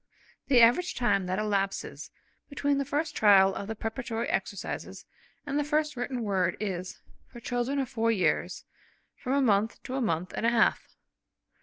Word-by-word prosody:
The 255 -4 +5
average 245 +11 +4
time 200 -6 +1
that 185 +1 -1
elapses 200 -2 -2 0.4
between 285 0 0
the 280 - -1
first 295 +4 -2
trial 195 -2 +5
of 200 - -5
the 225 - -4
preparatory 225 +1 -4
exercises 195 0 -4 0.4
and 285 0 -1
the - - +1
first 300 0 0
written 245 0 -3
word 195 -3 0
is, 185 -3 -4 0.3
for 240 - -12
children 245 +3 -2
of 270 -2 0
four 230 0 0
years, 200 -5 0 0.5
from 260 -1 -3
a 280 - +3
month 215 -1 +1
to 255 - -6
a 270 - -1
month 180 -5 -1
and - - -4
a 230 - +4
half. 235 -1 +2
230 Hz, 170 wpm, -28 LUFS, 200-270 Hz, 0.5 s, The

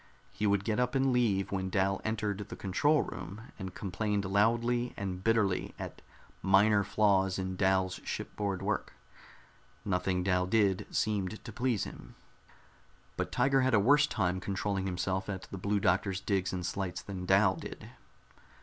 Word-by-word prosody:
He 105 - -1
would 100 -1 +2
get 110 +2 0
up 125 +1 0
and 135 -1 +3
leave 105 -6 +1
when 95 -1 -1
Dal 95 0 +1
entered 105 -2 -2
the - - -6
control 145 +11 +2
room, 105 +6 -8
and 95 -2 -6
complained 100 +1 -2
loudly 120 +5 +1
and 95 -2 -4
bitterly 110 -4 +1
at - - -7 0.4
minor 100 +2 +4
flaws 95 -2 +2
in 95 -1 -3
Dal's 95 -1 +1
shipboard 100 -3 -3
work. - - -2 0.9
Nothing 90 -1 0
Dal 90 -1 +1
did 100 -2 +2
seemed 105 -1 -1
to 115 - -6
please 120 -3 0
him. - - -9 1.0
But - - -3
Tiger 135 +2 +3
had 130 -2 +3
a - - +5
worse 145 +8 +5
time 95 -8 0
controlling 95 0 -2
himself 95 +1 -2
at 95 -2 -4
the 95 - -5
Blue 100 +2 0
Doctor's 95 +1 +1
digs 95 -2 0
and 90 -1 -3
slights 95 0 -3
than 95 -2 -6
Dal - - +4
did. - - -8
100 Hz, 160 wpm, -31 LUFS, 95-110 Hz, 1.0 s, a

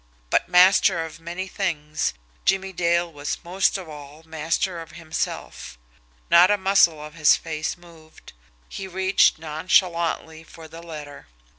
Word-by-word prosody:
But, - - +1
master 180 -1 +5
of 160 0 -11
many 175 +3 -6
things, 155 - -2 0.3
Jimmie 195 0 0
Dale 170 -1 0
was 145 +1 -4
most 190 +3 +1
of 185 -3 -9
all 150 0 -12
master 165 +2 -2
of 165 +1 -12
himself. 155 - -5 0.5
Not 175 +2 +7
a 205 - +3
muscle 190 -5 +3
of 150 0 -9
his 155 -2 +5
face 155 0 -4
moved. 165 - -17 0.3
He 195 - -7
reached 190 +1 +2
nonchalantly 160 0 0
for 160 0 -13
the 165 +1 -11
letter. 150 -4 -10
165 Hz, 140 wpm, -23 LUFS, 155-180 Hz, 0.5 s, Not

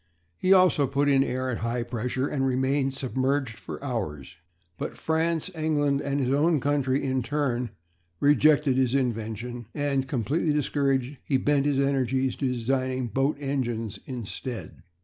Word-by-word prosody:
He 185 - 0
also 185 -7 +5
put 140 +2 +1
in 135 -1 +5
air 130 -1 -2
at 115 - -3
high 120 +1 -1
pressure 125 +3 -2
and 135 -2 -1
remained 135 +1 +1
submerged 130 -2 -1
for - - -8
hours. 90 - -4 0.4
But - - -4
France, 160 +2 0
England, 145 -3 +1
and 140 0 -1
his 130 -1 +1
own 155 +2 +3
country 140 -1 +1
in 130 -1 0
turn 125 -3 -1 0.5
rejected 145 -1 +4
his 130 -1 +2
invention; 120 -2 -2
and, 140 -2 0
completely 145 +5 0
discouraged, 140 -2 0
he 135 - +1
bent 145 +1 +2
his 145 -2 +1
energies 135 -2 +1
to 135 - 0
designing 130 +1 -1
boat 135 +6 +1
engines 120 -7 -2
instead. 125 -2 -6
135 Hz, 150 wpm, -26 LUFS, 125-145 Hz, 0.5 s, also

